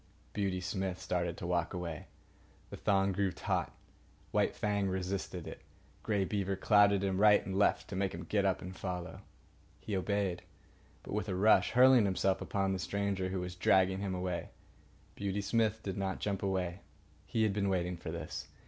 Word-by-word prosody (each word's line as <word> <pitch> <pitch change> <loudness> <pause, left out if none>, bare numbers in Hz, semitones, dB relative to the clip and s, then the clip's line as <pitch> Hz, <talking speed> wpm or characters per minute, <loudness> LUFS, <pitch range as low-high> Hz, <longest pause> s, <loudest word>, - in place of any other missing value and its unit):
Beauty 95 -3 -1
Smith 95 -1 -3
started 85 -2 -2
to - - -6
walk 85 0 0
away. 85 -3 -5 0.6
The - - -6
thong 100 -1 +2
grew 95 0 0
taut. - - -2 0.6
White - - +1
Fang 100 -2 0
resisted 95 -1 -3
it. - - -8 0.4
Grey 100 -3 0
Beaver 100 -1 -1
clouted 100 0 +4
him 95 0 0
right 105 -1 +6
and 95 - -4
left 100 +1 +2
to 100 - -5
make 95 0 0
him 85 -1 -6
get 100 +4 0
up 95 -1 0
and 90 +1 -7
follow. 90 -3 -5 0.6
He 105 - -4
obeyed, 95 -1 -1 0.6
but - - -7
with 100 - -2
a 95 - -1
rush, 105 +4 +4
hurling 125 -2 +7
himself 95 0 +1
upon 95 -1 0
the 95 - -2
stranger 100 -1 -1
who 95 -1 -2
was 90 0 -5
dragging 95 +1 +3
him 100 -2 -2
away. 90 -1 -3 0.6
Beauty 100 0 -2
Smith 110 +1 +1
did 95 -1 -4
not 95 -1 -2
jump 100 -2 -2
away. 95 -2 -1 0.5
He 110 - +1
had 105 -2 +2
been 100 -1 0
waiting 90 -1 0
for 85 - -7
this. - - -5
95 Hz, 180 wpm, -33 LUFS, 90-100 Hz, 0.6 s, hurling